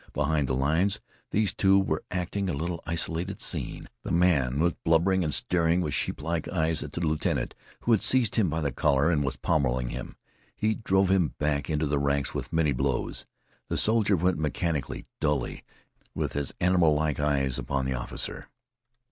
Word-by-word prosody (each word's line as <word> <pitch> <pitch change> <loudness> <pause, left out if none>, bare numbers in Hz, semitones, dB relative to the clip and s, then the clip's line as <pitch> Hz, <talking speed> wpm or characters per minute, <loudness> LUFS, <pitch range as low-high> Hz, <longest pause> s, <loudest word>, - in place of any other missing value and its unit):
Behind 75 -1 +1
the 65 - 0
lines 80 +10 +1 0.3
these 105 -3 +1
two 95 0 +4
were 95 - 0
acting 90 +2 -2
a - - -1
little 85 +3 -3
isolated 85 +3 -2
scene. - - -3
The - - -6
man 75 -7 +2
was 85 +1 +3
blubbering 90 +3 +3
and 75 - -1
staring 85 +2 +2
with 75 -6 -1
sheeplike 80 +1 -2
eyes 80 -2 0
at 75 - -7
the 85 - -3
lieutenant, 80 -2 0 0.3
who 120 - 0
had 110 - +4
seized 125 -5 +3
him 105 -6 +3
by 80 +2 -1
the 70 -2 0
collar 70 +4 +2
and 75 -4 +1
was 65 - -2
pommeling 65 -4 0
him. - - -6 0.4
He 110 +1 +1
drove 95 -3 +1
him 90 -5 +2
back 75 -2 -1
into 80 0 0
the 70 -1 0
ranks 70 -1 0
with - - -4
many 80 -3 +2
blows. 65 0 -2 0.4
The - - -2
soldier 110 -2 +3
went 90 0 +1
mechanically, 75 -1 -2
dully, 75 -2 -1 0.5
with - - -2
his 70 -1 -2
animal 90 -4 +4
like 75 -1 0
eyes 70 -3 +1
upon 70 -1 -2
the 65 - -1
officer. - - -5
80 Hz, 180 wpm, -27 LUFS, 70-90 Hz, 0.5 s, two